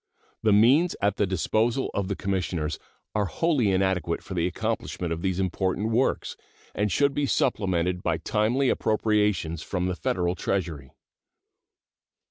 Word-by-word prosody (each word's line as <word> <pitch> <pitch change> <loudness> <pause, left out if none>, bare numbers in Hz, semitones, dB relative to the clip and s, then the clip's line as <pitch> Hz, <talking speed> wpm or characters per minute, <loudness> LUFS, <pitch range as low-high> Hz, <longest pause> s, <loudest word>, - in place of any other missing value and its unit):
The 110 - +3
means 130 - +5
at 100 +1 +1
the 100 - +2
disposal 110 +8 0
of 100 -2 -1
the 100 - -2
Commissioners 90 -6 -2 0.3
are 105 -1 +1
wholly 135 - +1
inadequate 95 -3 0
for 95 - -7
the 85 -1 +1
accomplishment 90 -4 -3
of 85 - -5
these 95 0 -1
important 95 +3 -1
works, 125 +4 0 0.4
and 105 0 0
should 140 +9 +2
be 145 0 0
supplemented 90 -9 0
by 85 -3 0
timely 110 - +1
appropriations 105 -7 +1
from 90 +1 -2
the 90 0 -1
Federal 90 -1 0
Treasury. 85 -7 -3
95 Hz, 140 wpm, -26 LUFS, 90-110 Hz, 0.4 s, means